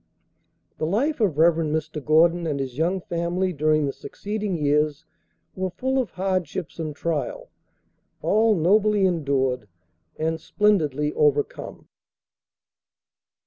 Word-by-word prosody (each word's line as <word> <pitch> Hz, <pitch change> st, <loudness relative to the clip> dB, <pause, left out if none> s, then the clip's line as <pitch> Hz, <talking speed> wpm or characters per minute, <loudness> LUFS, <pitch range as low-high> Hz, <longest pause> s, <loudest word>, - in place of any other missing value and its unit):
The 155 Hz, -, 0 dB
life 260 Hz, -, 0 dB
of 195 Hz, -10 st, +1 dB
Rev. 165 Hz, +1 st, +5 dB
Mr. 155 Hz, -1 st, -2 dB
Gordon 165 Hz, +3 st, +3 dB
and 145 Hz, -3 st, -2 dB
his 130 Hz, -2 st, -4 dB
young 175 Hz, +6 st, 0 dB
family 175 Hz, +2 st, -1 dB
during 155 Hz, 0 st, +2 dB
the 140 Hz, -, -2 dB
succeeding 205 Hz, -3 st, -4 dB
years 150 Hz, 0 st, +1 dB, 0.5 s
were 185 Hz, 0 st, -2 dB
full 260 Hz, +9 st, -1 dB
of 245 Hz, -6 st, -1 dB
hardships 185 Hz, -3 st, -3 dB
and 155 Hz, -2 st, -4 dB
trial, 170 Hz, -, -3 dB, 0.7 s
all 220 Hz, 0 st, +3 dB
nobly 200 Hz, +4 st, +3 dB
endured 135 Hz, -, 0 dB, 0.5 s
and 160 Hz, 0 st, -1 dB
splendidly 150 Hz, -9 st, +1 dB
overcome. 145 Hz, -1 st, 0 dB
165 Hz, 115 wpm, -24 LUFS, 150-190 Hz, 0.7 s, Rev